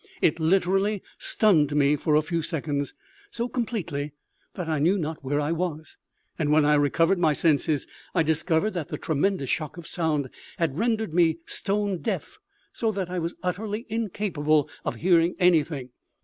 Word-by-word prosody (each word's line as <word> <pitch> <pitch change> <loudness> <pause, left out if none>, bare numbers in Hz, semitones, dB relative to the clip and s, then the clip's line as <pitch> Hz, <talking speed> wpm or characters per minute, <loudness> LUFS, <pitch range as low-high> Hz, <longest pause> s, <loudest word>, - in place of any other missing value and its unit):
It 165 - +2
literally 195 +4 +2 0.2
stunned 155 -9 +3
me 145 0 +4
for 150 +1 +1
a 155 - +4
few 165 +2 -1
seconds, 145 -3 -3 0.3
so 240 - -2
completely 180 - -3 0.4
that 180 -4 -4
I 155 -2 0
knew 175 +7 +3
not 160 -4 -4
where 145 +2 0
I 150 +2 0
was; 160 -3 -3 0.4
and 150 -2 +1
when 150 0 +5
I 150 - +4
recovered 165 +5 +3
my 160 -3 +3
senses 150 0 +2 0.3
I 165 - +4
discovered 160 +5 +1
that 170 -5 -3
the - - -4
tremendous 160 -2 0
shock 155 +1 -2
of 170 - -9
sound 150 -6 -1 0.3
had 165 -2 -1
rendered 220 -5 0
me 165 -2 +3
stone 200 -2 -1
deaf, 230 - -4 0.3
so 225 -2 0
that 190 -3 -3
I 180 - -1
was 170 +1 -3
utterly 210 +5 -3
incapable 180 -9 0 0.2
of - - -2
hearing 170 -1 +3
anything. 160 -7 +2
165 Hz, 165 wpm, -26 LUFS, 150-195 Hz, 0.4 s, when